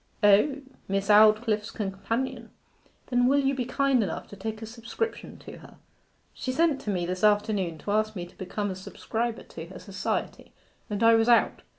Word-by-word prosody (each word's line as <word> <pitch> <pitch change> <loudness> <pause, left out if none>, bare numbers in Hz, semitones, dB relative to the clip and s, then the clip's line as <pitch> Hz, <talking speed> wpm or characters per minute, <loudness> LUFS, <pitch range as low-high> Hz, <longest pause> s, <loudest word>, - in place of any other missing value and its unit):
'O, 215 +8 +4 0.2
Miss 195 +1 -1
Aldclyffe's 215 0 +5
companion. 220 +5 -3 0.6
Then 245 0 +3
will 275 +2 +4
you 275 -1 +2
be 255 -2 -2
kind 270 0 +2
enough 190 -6 -3
to - - -10
take 215 +2 -5
a - - -4
subscription 230 - -5
to - - -11
her? - - -15 0.6
She 255 - -4
sent 315 0 +1
to - - -5
me 180 -3 -1
this 180 +2 -4
afternoon 205 -5 +2
to 200 - -5
ask 215 +1 +1
me 175 -2 -4
to 175 - -17
become 200 +2 -3
a - - -5
subscriber 225 +5 -4
to 165 0 -9
her 185 - -10
Society, 190 -2 -4 0.4
and 210 +1 -2
I 230 0 +7
was 225 +1 +3
out. 235 - +3
215 Hz, 185 wpm, -27 LUFS, 195-245 Hz, 0.6 s, I